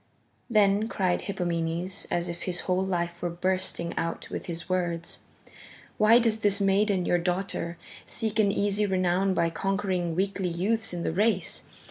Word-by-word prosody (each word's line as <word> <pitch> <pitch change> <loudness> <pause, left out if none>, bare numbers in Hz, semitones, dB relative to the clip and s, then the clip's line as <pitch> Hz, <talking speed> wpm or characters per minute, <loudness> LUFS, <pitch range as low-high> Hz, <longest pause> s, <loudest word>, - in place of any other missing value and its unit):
Then 210 -1 +3
cried 185 -5 0
Hippomenes 175 0 -2
as 175 0 0
if 170 0 -6
his 175 -1 0
whole 185 0 0
life 175 -2 -2
were 175 - -1
bursting 185 -1 -1
out 165 - -3
with - - -5
his 170 -1 -5
words: 175 -2 -2 0.8
"Why 215 +2 +7
does 230 -2 +2
this 205 -1 +3
maiden, 195 -1 +2
your 175 - +2
daughter, 175 -1 -2 0.3
seek 220 -1 -2
an 205 -2 +4
easy 205 +1 +1
renown 185 0 +1
by 165 -1 +2
conquering 185 -2 -1
weakly 195 0 0
youths 215 +6 0
in 175 -1 -4
the - - -1
race? 205 -1 0
185 Hz, 155 wpm, -27 LUFS, 175-200 Hz, 0.8 s, Why